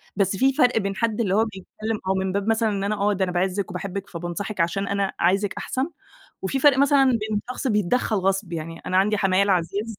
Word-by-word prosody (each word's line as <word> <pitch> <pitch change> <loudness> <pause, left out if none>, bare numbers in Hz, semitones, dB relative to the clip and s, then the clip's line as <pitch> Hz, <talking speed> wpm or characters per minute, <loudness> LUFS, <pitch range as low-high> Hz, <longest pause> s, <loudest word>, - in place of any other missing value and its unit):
بس 195 -1 +1
فيه 270 +4 +3
فرق 250 -4 +3
بين 200 -2 -1
حد 230 +2 0
اللي 195 -4 +1
هو 220 - +4
بيتكلّم، 215 +1 -5
أو 190 - +3
من 190 0 -1
باب 200 +2 -2
مثلًا 225 0 +2
إن 200 -2 -2
أنا 205 +1 0
آه 205 0 +1
ده 195 -1 0
أنا 185 - -1
باعزِّك 185 +2 -1
وباحبِك 195 +2 -5
فبانصحِك 175 +4 -5
علشان 195 +4 -1
أنا 200 -1 0
عايزِِك 195 +3 +2
أحسن، 265 +5 -2 0.5
وفي 230 +8 -1
فرق 270 -1 +5
مثلًا 280 0 +5
بين 220 -5 0
شخص 255 - -4
بيتدخّل 215 0 +1
غصب 195 -1 0
يعني. 165 0 -5
أنا 185 - 0
عندي 205 +3 +3
حمايا 195 0 +3
العزيز 200 +3 -1
200 Hz, 215 wpm, -23 LUFS, 190-220 Hz, 0.5 s, فرق